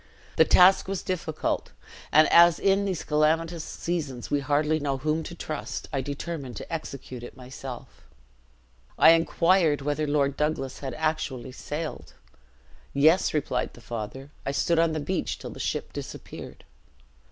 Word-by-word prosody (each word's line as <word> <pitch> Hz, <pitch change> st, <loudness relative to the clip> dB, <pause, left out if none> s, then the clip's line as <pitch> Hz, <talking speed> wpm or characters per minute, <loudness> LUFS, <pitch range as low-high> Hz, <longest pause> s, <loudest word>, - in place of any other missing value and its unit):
The -, -, +7 dB
task 185 Hz, +2 st, +6 dB
was 195 Hz, -2 st, -3 dB
difficult; 165 Hz, -4 st, -2 dB, 0.4 s
and, 155 Hz, +1 st, +6 dB
as 170 Hz, 0 st, +7 dB
in 195 Hz, 0 st, +2 dB
these 185 Hz, -4 st, -2 dB
calamitous 160 Hz, +2 st, +1 dB
seasons 150 Hz, -10 st, -4 dB
we 145 Hz, -, +2 dB
hardly 150 Hz, +2 st, +1 dB
know 140 Hz, -2 st, -1 dB
whom 155 Hz, +3 st, 0 dB
to 170 Hz, -, -8 dB
trust, 155 Hz, -3 st, -5 dB
I 135 Hz, -, 0 dB
determined 140 Hz, -1 st, -5 dB
to -, -, -7 dB
execute 135 Hz, -5 st, -6 dB
it 120 Hz, -, -10 dB
myself.' 130 Hz, 0 st, -9 dB, 1.0 s
"I -, -, +8 dB
inquired 165 Hz, -1 st, +3 dB
whether 145 Hz, +2 st, -1 dB
Lord 140 Hz, -1 st, +1 dB
Douglas 150 Hz, -3 st, -2 dB
had 135 Hz, -3 st, -5 dB
actually 145 Hz, -5 st, -2 dB
sailed. 150 Hz, +4 st, -6 dB, 0.8 s
'Yes,' 155 Hz, +6 st, +4 dB
replied 130 Hz, -4 st, -1 dB
the -, -, -13 dB
father; 120 Hz, +5 st, -6 dB
'I -, -, -2 dB
stood 165 Hz, +4 st, +2 dB
on 165 Hz, -1 st, +3 dB
the 155 Hz, -, -1 dB
beach 180 Hz, +5 st, -2 dB
till -, -, -8 dB
the -, -, -10 dB
ship -, -, -3 dB
disappeared.'" -, -, -8 dB
150 Hz, 150 wpm, -26 LUFS, 135-165 Hz, 1.0 s, I